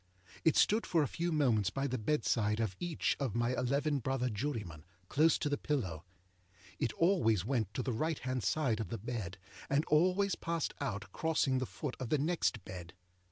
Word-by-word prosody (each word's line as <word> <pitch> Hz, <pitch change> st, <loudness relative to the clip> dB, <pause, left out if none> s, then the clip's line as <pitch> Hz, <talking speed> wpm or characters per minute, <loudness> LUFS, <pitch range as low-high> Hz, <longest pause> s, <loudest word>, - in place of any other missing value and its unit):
It 160 Hz, -, +4 dB
stood 220 Hz, +2 st, +4 dB
for 165 Hz, -3 st, +3 dB
a -, -, 0 dB
few 170 Hz, +7 st, -2 dB
moments 120 Hz, -, +3 dB
by 135 Hz, +9 st, -2 dB
the 130 Hz, -2 st, -1 dB
bedside 110 Hz, -4 st, +1 dB
of 110 Hz, -5 st, -1 dB
each 175 Hz, -3 st, 0 dB
of 130 Hz, -6 st, -2 dB
my 120 Hz, +1 st, +1 dB
eleven 140 Hz, +4 st, +1 dB
brother 130 Hz, 0 st, -1 dB
jurymen, 105 Hz, -, -4 dB, 0.3 s
close 155 Hz, +2 st, +4 dB
to -, -, -1 dB
the 145 Hz, -1 st, -1 dB
pillow. 95 Hz, -, -2 dB, 0.7 s
It -, -, +1 dB
always 140 Hz, -, +3 dB
went 115 Hz, -5 st, 0 dB
to 130 Hz, -, -1 dB
the 130 Hz, -, -1 dB
right 155 Hz, +7 st, 0 dB
hand 130 Hz, 0 st, -2 dB
side 120 Hz, +1 st, +1 dB
of 110 Hz, -, -3 dB
the 115 Hz, -, -3 dB
bed, 105 Hz, -4 st, -5 dB, 0.3 s
and 140 Hz, +3 st, +2 dB
always 185 Hz, +5 st, +3 dB
passed 165 Hz, -2 st, -2 dB
out 100 Hz, -8 st, -3 dB
crossing 145 Hz, -, +1 dB
the 130 Hz, -, -2 dB
foot 145 Hz, -4 st, -5 dB
of 130 Hz, -3 st, -4 dB
the 150 Hz, -, +3 dB
next 155 Hz, -, 0 dB
bed. 90 Hz, -1 st, -8 dB
130 Hz, 190 wpm, -34 LUFS, 110-150 Hz, 0.7 s, It